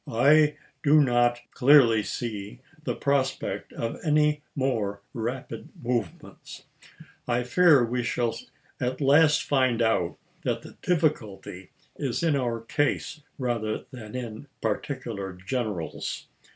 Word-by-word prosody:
I 150 Hz, +5 st, +5 dB, 0.3 s
do 150 Hz, +1 st, +5 dB
not 120 Hz, -3 st, +3 dB
clearly 125 Hz, -5 st, +6 dB
see 105 Hz, -2 st, -5 dB, 0.3 s
the -, -, -1 dB
prospect 140 Hz, -2 st, -1 dB
of 115 Hz, -, -4 dB
any 150 Hz, -1 st, +2 dB
more 110 Hz, -8 st, -1 dB
rapid 120 Hz, +3 st, -5 dB
movements. 120 Hz, -8 st, -4 dB, 0.6 s
I 120 Hz, 0 st, +1 dB
fear 145 Hz, 0 st, +5 dB
we 125 Hz, +2 st, -1 dB
shall 120 Hz, -1 st, 0 dB, 0.5 s
at 125 Hz, +1 st, -2 dB
last 150 Hz, +2 st, +5 dB
find 130 Hz, -4 st, +2 dB
out 110 Hz, -7 st, +1 dB, 0.3 s
that -, -, -1 dB
the -, -, -12 dB
difficulty 105 Hz, -, -1 dB, 0.3 s
is 135 Hz, +1 st, -2 dB
in 160 Hz, -3 st, +3 dB
our 120 Hz, -4 st, -1 dB
case 145 Hz, +4 st, -1 dB, 0.2 s
rather 115 Hz, -4 st, -2 dB
than 115 Hz, -3 st, -9 dB
in 120 Hz, +1 st, -6 dB
particular 110 Hz, -3 st, -3 dB
generals. 95 Hz, -2 st, -4 dB
125 Hz, 115 wpm, -26 LUFS, 110-140 Hz, 0.6 s, clearly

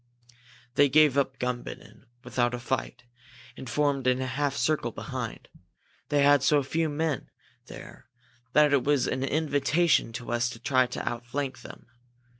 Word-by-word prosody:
"They 145 Hz, +1 st, +4 dB
gave 150 Hz, 0 st, +5 dB
up 135 Hz, -2 st, 0 dB
Gumbinnen 125 Hz, -2 st, -6 dB, 0.2 s
without 120 Hz, 0 st, 0 dB
a -, -, -6 dB
fight, 125 Hz, -1 st, -3 dB, 0.5 s
and 130 Hz, -, -8 dB
formed 140 Hz, -1 st, 0 dB
in 125 Hz, 0 st, +3 dB
a 130 Hz, -, -2 dB
half 140 Hz, +2 st, -1 dB
circle 150 Hz, +4 st, 0 dB
behind. -, -, -6 dB, 0.6 s
They 145 Hz, -1 st, +3 dB
had 145 Hz, -1 st, +5 dB
so 145 Hz, +1 st, +3 dB
few 160 Hz, +4 st, -1 dB
men 150 Hz, -2 st, -2 dB, 0.4 s
there -, -, -12 dB, 0.5 s
that 150 Hz, -1 st, +5 dB
it 140 Hz, -, +3 dB
was 145 Hz, -3 st, +2 dB
an 130 Hz, -, -2 dB
invitation 150 Hz, 0 st, +1 dB
to 120 Hz, +1 st, -6 dB
us 120 Hz, +1 st, +1 dB
to 120 Hz, -1 st, -9 dB
try 130 Hz, -2 st, +2 dB
to -, -, -6 dB
outflank 125 Hz, +2 st, -4 dB
them. -, -, -12 dB
135 Hz, 155 wpm, -27 LUFS, 125-145 Hz, 0.6 s, gave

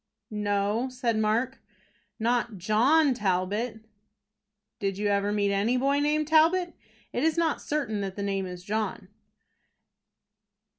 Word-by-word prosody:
"No," 210 Hz, +3 st, 0 dB
said 245 Hz, -2 st, -1 dB
Mark, 235 Hz, +5 st, 0 dB, 0.6 s
"not 235 Hz, -1 st, 0 dB
John 255 Hz, -, +3 dB
Talbot." 210 Hz, +2 st, -1 dB, 1.0 s
"Did 195 Hz, -1 st, -2 dB
you 205 Hz, 0 st, 0 dB
ever 200 Hz, 0 st, +1 dB
meet 205 Hz, -1 st, +1 dB
any 215 Hz, +6 st, +1 dB
boy 275 Hz, +2 st, +2 dB
named 300 Hz, +1 st, +1 dB
Talbot? 335 Hz, +3 st, +4 dB, 0.4 s
It 245 Hz, -, -1 dB
is 320 Hz, +1 st, +2 dB
not 330 Hz, -3 st, +1 dB
certain 260 Hz, -9 st, -2 dB
that 195 Hz, -1 st, -4 dB
the 200 Hz, -, -4 dB
name 195 Hz, -1 st, -1 dB
is 180 Hz, -1 st, -8 dB
John." 205 Hz, -1 st, -3 dB
220 Hz, 130 wpm, -27 LUFS, 200-270 Hz, 1.0 s, Talbot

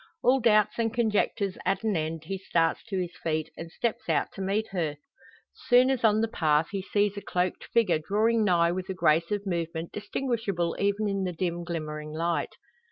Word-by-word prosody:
All 260 Hz, +2 st, +4 dB
doubts 215 Hz, -2 st, +3 dB
and 225 Hz, -1 st, +1 dB
conjectures 210 Hz, -4 st, 0 dB
at 195 Hz, +2 st, 0 dB
an 215 Hz, -3 st, +1 dB
end, 160 Hz, 0 st, -2 dB
he 190 Hz, +4 st, -4 dB
starts 165 Hz, -3 st, 0 dB
to 200 Hz, -4 st, -3 dB
his 180 Hz, -1 st, -4 dB
feet, 155 Hz, -1 st, -1 dB
and 165 Hz, 0 st, -8 dB
steps 235 Hz, +3 st, -3 dB
out -, -, +1 dB
to 195 Hz, -, -7 dB
meet 200 Hz, +3 st, -1 dB
her. 160 Hz, -6 st, -2 dB, 0.6 s
Soon 250 Hz, +1 st, +4 dB
as 260 Hz, -3 st, -1 dB
on 215 Hz, -1 st, +4 dB
the 225 Hz, -, +1 dB
path 155 Hz, -7 st, +1 dB
he 195 Hz, -1 st, -2 dB
sees 205 Hz, +1 st, 0 dB
a -, -, -4 dB
cloaked 180 Hz, -1 st, -2 dB
figure, 195 Hz, -9 st, +2 dB
drawing 220 Hz, +7 st, +2 dB
nigh 170 Hz, -4 st, +3 dB
with 185 Hz, +1 st, -4 dB
a 190 Hz, -, -3 dB
grace 165 Hz, -1 st, +3 dB
of 205 Hz, -1 st, -2 dB
movement 170 Hz, -2 st, -3 dB
distinguishable 210 Hz, -6 st, -2 dB
even 200 Hz, +1 st, +1 dB
in 195 Hz, -1 st, -1 dB
the 180 Hz, -1 st, -2 dB
dim 175 Hz, 0 st, -2 dB
glimmering 155 Hz, -3 st, -5 dB
light. 165 Hz, +2 st, -1 dB
190 Hz, 195 wpm, -27 LUFS, 170-215 Hz, 0.6 s, All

